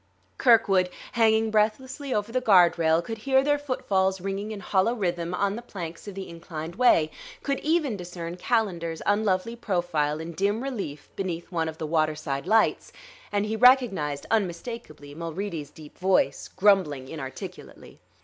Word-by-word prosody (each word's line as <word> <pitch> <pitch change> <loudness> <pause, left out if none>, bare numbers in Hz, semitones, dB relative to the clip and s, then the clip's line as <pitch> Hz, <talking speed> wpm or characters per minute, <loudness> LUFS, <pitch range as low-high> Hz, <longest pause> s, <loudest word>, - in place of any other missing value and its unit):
Kirkwood, 200 -7 +4 0.2
hanging 220 -1 +3
breathlessly 255 +6 0
over 210 -1 -1
the 255 +1 0
guard 180 -8 +5
rail, 160 +1 +3
could 225 +4 -6
hear 265 +3 +3
their 290 +1 +2
footfalls 190 -9 0
ringing 195 +3 -4
in 210 - -5
hollow 200 +4 +1
rhythm 175 -5 -2
on 200 +2 0
the 235 - -6
planks 175 -6 -8
of 200 - -7
the 195 -1 -6
inclined 165 -1 -7
way, 170 -10 +4 0.3
could 275 -1 -1
even 305 -8 +1
discern 175 -1 -6
Calendar's 180 -6 -1
unlovely 205 +1 +1
profile 175 -9 -1
in 165 +1 -6
dim 200 +7 0
relief 195 - -5
beneath 180 -2 -4
one 165 -2 -1
of 160 - -9
the 160 - -4
waterside 155 -3 -1
lights; 220 0 +2 0.4
and 205 0 +1
he 215 +1 -2
recognized 220 - +4
unmistakably 175 -7 -3
Mulready's 165 -1 -5
deep 150 0 -14
voice, 185 -7 +2
grumbling 185 -9 +2
inarticulately. 135 -3 -9
190 Hz, 150 wpm, -26 LUFS, 165-220 Hz, 0.4 s, guard